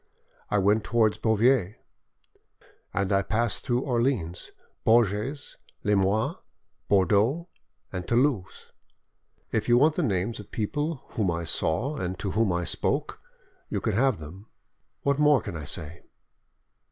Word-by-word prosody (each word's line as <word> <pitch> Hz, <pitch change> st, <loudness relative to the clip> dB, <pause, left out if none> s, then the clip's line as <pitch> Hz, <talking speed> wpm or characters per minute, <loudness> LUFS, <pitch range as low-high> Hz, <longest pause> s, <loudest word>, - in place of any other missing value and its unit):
I 105 Hz, -, +1 dB
went 105 Hz, +2 st, +3 dB
towards 110 Hz, -2 st, +2 dB
Beauvais, 110 Hz, -2 st, +2 dB, 1.2 s
end 100 Hz, +1 st, 0 dB
I 95 Hz, -, +4 dB
passed 110 Hz, +2 st, -1 dB
through 120 Hz, 0 st, +1 dB
Orleans, 120 Hz, -, -1 dB, 0.3 s
Bourges, 115 Hz, +4 st, +1 dB, 0.3 s
Limoges, 100 Hz, +1 st, +1 dB, 0.5 s
Bordeaux, 105 Hz, -, +2 dB, 0.4 s
and 90 Hz, -2 st, -4 dB
Toulouse. 120 Hz, -6 st, 0 dB, 0.8 s
If -, -, -1 dB
you 120 Hz, -, +6 dB
want 150 Hz, +5 st, +5 dB
the 175 Hz, -, -1 dB
names 105 Hz, -, -1 dB
of 105 Hz, -, -10 dB
people 145 Hz, +7 st, -2 dB
whom 105 Hz, -5 st, -1 dB
I 85 Hz, 0 st, -2 dB
saw 115 Hz, -, -1 dB
and 90 Hz, -5 st, -3 dB
to 95 Hz, 0 st, -3 dB
whom 110 Hz, -1 st, +2 dB
I 85 Hz, 0 st, 0 dB
spoke, -, -, -2 dB, 0.5 s
you -, -, -1 dB
can -, -, -1 dB
have 130 Hz, +1 st, +2 dB
them. 85 Hz, +7 st, -11 dB, 0.6 s
What 140 Hz, 0 st, +1 dB
more 150 Hz, -2 st, +5 dB
can 105 Hz, -5 st, -7 dB
I 75 Hz, -2 st, -6 dB
say?" 80 Hz, +1 st, -5 dB
105 Hz, 135 wpm, -27 LUFS, 95-125 Hz, 1.2 s, you